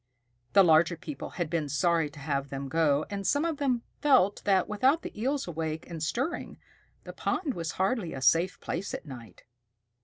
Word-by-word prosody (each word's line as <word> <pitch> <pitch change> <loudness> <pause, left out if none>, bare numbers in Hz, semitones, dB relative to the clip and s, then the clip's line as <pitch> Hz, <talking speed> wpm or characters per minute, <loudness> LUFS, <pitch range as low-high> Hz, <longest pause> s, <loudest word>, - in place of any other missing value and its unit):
The 195 - +8
larger 165 0 +4
people 290 - -7
had 175 -3 0
been 155 -2 -2
sorry 165 +1 +2
to 145 - -16
have 140 -1 -2
them 135 0 -5
go, 150 -1 +2
and 200 -1 -3
some 290 +2 +2
of 325 -3 -1
them 255 -5 0 0.2
felt 255 -9 +4
that 190 -3 +3
without 260 +10 +2
the - - -7
Eels 270 +1 -1
awake 160 -1 -4
and 165 -3 -7
stirring, 265 - -2 0.5
the - - -9
pond 280 - -1
was 165 -4 -4
hardly 190 -1 0
a 135 - -5
safe 165 +7 +3
place 180 +4 -4
at - - -8
night. 120 - -11
170 Hz, 185 wpm, -29 LUFS, 155-235 Hz, 0.5 s, The